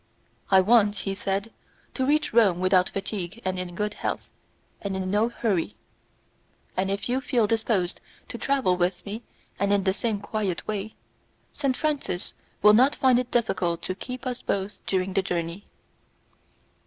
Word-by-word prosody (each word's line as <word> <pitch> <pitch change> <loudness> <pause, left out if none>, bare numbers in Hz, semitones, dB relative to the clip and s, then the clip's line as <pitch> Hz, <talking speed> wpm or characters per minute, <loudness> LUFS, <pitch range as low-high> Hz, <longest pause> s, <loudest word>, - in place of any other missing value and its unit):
"I 190 -1 +7
want," 210 0 +4
he 195 0 -2
said, 200 +2 -2 0.4
"to 260 - -1
reach 300 -1 +2
Rome 205 -7 +5
without 185 0 +4
fatigue 195 0 -4
and 185 0 -1
in 180 -1 -5
good 210 +1 -1
health. - - -4 0.5
I - - -1
am 195 - -2
in 185 -1 -2
no 215 +3 +3
hurry, 210 -5 -1 1.0
and 190 +1 0
if 200 +1 -2
you 255 +2 0
feel 245 -3 +2
disposed 215 -4 0 0.3
to - - -6
travel 260 -10 +2
with 175 0 0
me 210 +3 -5 0.4
and 200 0 +2
in 200 -1 +3
the 190 -1 +2
same 220 0 -1
quiet 205 -3 -2
way, 210 0 -3 0.6
Saint 270 -3 0
Francis 290 - -1 0.3
will 210 0 +9
not 255 +6 +5
find 255 -2 +4
it 250 -1 -3
difficult 185 -8 0
to 185 - -2
keep 250 +7 -7
us 250 -1 -3
both 200 +1 -2
during 190 0 0
the 195 - +3
journey." 175 0 -3
200 Hz, 165 wpm, -26 LUFS, 185-230 Hz, 1.0 s, will